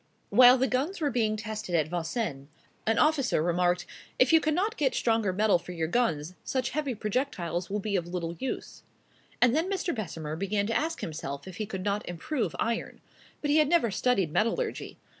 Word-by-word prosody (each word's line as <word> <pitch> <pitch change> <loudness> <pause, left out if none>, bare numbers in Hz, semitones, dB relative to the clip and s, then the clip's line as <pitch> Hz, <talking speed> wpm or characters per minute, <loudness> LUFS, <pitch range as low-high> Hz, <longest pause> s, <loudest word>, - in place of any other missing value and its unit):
While 250 0 +8
the 260 - +2
guns 280 +11 -1
were 295 -3 0
being 220 -3 +1
tested 215 -4 -4
at 155 -3 +2
Vincennes, 165 - -3 0.4
an 225 0 +3
officer 275 - +3
remarked, 175 +1 +1 0.3
"If 255 +4 +4
you 325 - +8
cannot 365 +9 0
get 275 -4 +1
stronger 225 -4 +1
metal 205 -1 +3
for 180 - -9
your 165 -2 -1
guns, 170 -6 0
such 260 -1 -1
heavy 285 -3 -2
projectiles 195 - -2
will 205 +2 -1
be 205 0 -2
of 175 -2 -1
little 175 -1 -3
use." 265 - -5 0.6
And 245 +1 +4
then 330 +4 +1
Mr. 370 -3 -1
Bessemer 160 -8 -5
began 200 +3 -1
to 225 +2 -2
ask 325 +2 -1
himself 140 -1 -5
if 185 - -9
he 215 - -3
could 190 -3 -5
not 205 0 -1
improve 220 - -2
iron. 230 0 -2 0.4
But 290 - +1
he 300 - +4
had 305 -2 +4
never 320 -10 +3
studied 195 -5 +1
metallurgy. 435 - -1
215 Hz, 190 wpm, -28 LUFS, 175-265 Hz, 0.6 s, While